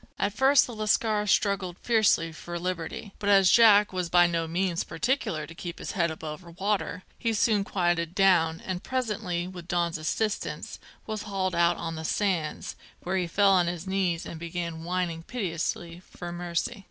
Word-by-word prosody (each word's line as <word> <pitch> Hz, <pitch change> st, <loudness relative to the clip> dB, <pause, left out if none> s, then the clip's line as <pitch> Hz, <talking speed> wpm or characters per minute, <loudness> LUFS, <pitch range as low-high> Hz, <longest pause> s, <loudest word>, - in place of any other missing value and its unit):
At 200 Hz, +1 st, 0 dB
first 265 Hz, +3 st, +5 dB
the 245 Hz, -, -8 dB
lascar 215 Hz, 0 st, +1 dB
struggled 195 Hz, -3 st, +1 dB
fiercely 215 Hz, -8 st, +3 dB
for 175 Hz, +1 st, -7 dB
liberty; 180 Hz, +3 st, -4 dB
but 205 Hz, -, -1 dB
as 195 Hz, -2 st, +6 dB
Jack 210 Hz, -4 st, +6 dB
was 180 Hz, -2 st, -2 dB
by 175 Hz, 0 st, +6 dB
no 165 Hz, -1 st, 0 dB
means 175 Hz, +1 st, 0 dB
particular 165 Hz, -, -1 dB
to 165 Hz, -, -11 dB
keep 170 Hz, 0 st, -7 dB
his -, -, -5 dB
head 170 Hz, -3 st, +1 dB
above 160 Hz, +2 st, -8 dB
water, 195 Hz, -2 st, -1 dB, 0.2 s
he 230 Hz, -2 st, 0 dB
soon 210 Hz, -1 st, +2 dB
quieted 175 Hz, -3 st, 0 dB
down, 175 Hz, -5 st, +4 dB
and 185 Hz, -1 st, -4 dB
presently, 210 Hz, -9 st, -2 dB
with 180 Hz, -2 st, -9 dB
Dons 170 Hz, -2 st, 0 dB
assistance, 210 Hz, +7 st, -2 dB, 0.3 s
was 215 Hz, -1 st, -4 dB
hauled 195 Hz, -3 st, -2 dB
out 170 Hz, 0 st, +3 dB
on 165 Hz, -, -4 dB
the 160 Hz, -, -5 dB
sands, 175 Hz, -3 st, -1 dB, 0.3 s
where 185 Hz, +2 st, -2 dB
he 180 Hz, -2 st, 0 dB
fell 200 Hz, +3 st, +4 dB
on 180 Hz, -3 st, +4 dB
his 170 Hz, 0 st, -4 dB
knees 190 Hz, -3 st, -1 dB
and 165 Hz, -, -7 dB
began 170 Hz, -1 st, -5 dB
whining 175 Hz, -1 st, -2 dB
piteously 170 Hz, -4 st, -3 dB
for 175 Hz, -1 st, -9 dB
mercy. 175 Hz, +5 st, -3 dB
180 Hz, 175 wpm, -27 LUFS, 170-205 Hz, 0.3 s, as